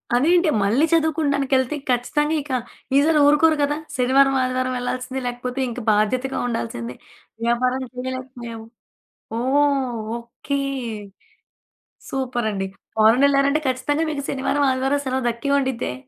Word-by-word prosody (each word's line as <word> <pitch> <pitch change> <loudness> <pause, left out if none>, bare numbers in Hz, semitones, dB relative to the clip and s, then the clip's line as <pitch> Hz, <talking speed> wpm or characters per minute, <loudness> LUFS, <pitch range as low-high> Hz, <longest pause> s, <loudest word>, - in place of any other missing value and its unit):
అదేంటి 340 +6 +4
మళ్ళీ 235 +10 +3
చదువుకుండానికెళ్తే 285 -4 +1
ఖచ్చితంగా 295 +5 +1
ఇక 285 0 -9 0.5
ఈసారి 305 +2 +4
ఊరుకోరు 300 +2 +5
కదా! 290 +1 +1 0.2
శనివారం, 270 +2 +4
ఆదివారం 255 0 -1
వెళ్ళాల్సిందే. 255 +1 -3
లేకపోతే 245 +1 -4
ఇంక 240 - -6
బాధ్యతగా 250 +6 +1
ఉండాల్సిందే. 120 - -4 0.5
వ్యాపారం 250 +2 +1
చేయలేకపోయాము. 250 -3 -6 0.7
ఓహ్! 270 -2 +1 0.2
ఓకే. 240 +4 -4 1.5
సూపరండి. 240 -7 -2 0.3
ఫారినెళ్లారంటే 275 +6 +4
ఖచ్చితంగా 290 +5 0
మీకు 285 -2 -3
శనివారం 280 +1 0
ఆదివారం 265 +2 0
సెలవు 260 -1 -1
దక్కి 235 +4 -3
ఉండిద్దే. 260 - -2
260 Hz, 105 wpm, -22 LUFS, 245-280 Hz, 1.5 s, ఊరుకోరు